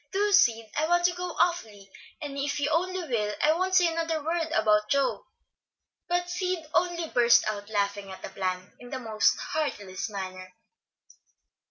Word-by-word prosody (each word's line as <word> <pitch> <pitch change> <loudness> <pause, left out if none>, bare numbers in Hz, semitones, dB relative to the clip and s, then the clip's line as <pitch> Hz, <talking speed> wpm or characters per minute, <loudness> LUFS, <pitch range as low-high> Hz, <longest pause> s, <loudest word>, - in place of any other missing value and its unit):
Do, 410 +2 +1
Sid! 230 - +4
I 310 - +1
want 350 +1 +3
to 355 - +3
go 355 -1 -5
awfully, 215 - -1 0.3
and 285 -1 -5
if 280 +1 -2
you 290 +1 0
only 365 +1 -1
will 210 -5 -1
I 305 +1 +4
won't 370 +3 0
say 360 -1 +6
another 325 -2 -1
word 325 +1 -1
about 210 -2 +2
Joe." 280 +2 0 0.8
But 355 0 0
Sid 360 -2 -2
only 345 -2 0
burst 240 -1 +5
out 205 -1 -4
laughing 200 -1 -1
at 190 - -10
the - - -5
plan, 185 -1 -4
in 245 - -11
the 260 - -4
most 220 -4 +2
heartless 205 -11 -3
manner. 185 -2 -7
280 Hz, 170 wpm, -27 LUFS, 210-345 Hz, 0.8 s, say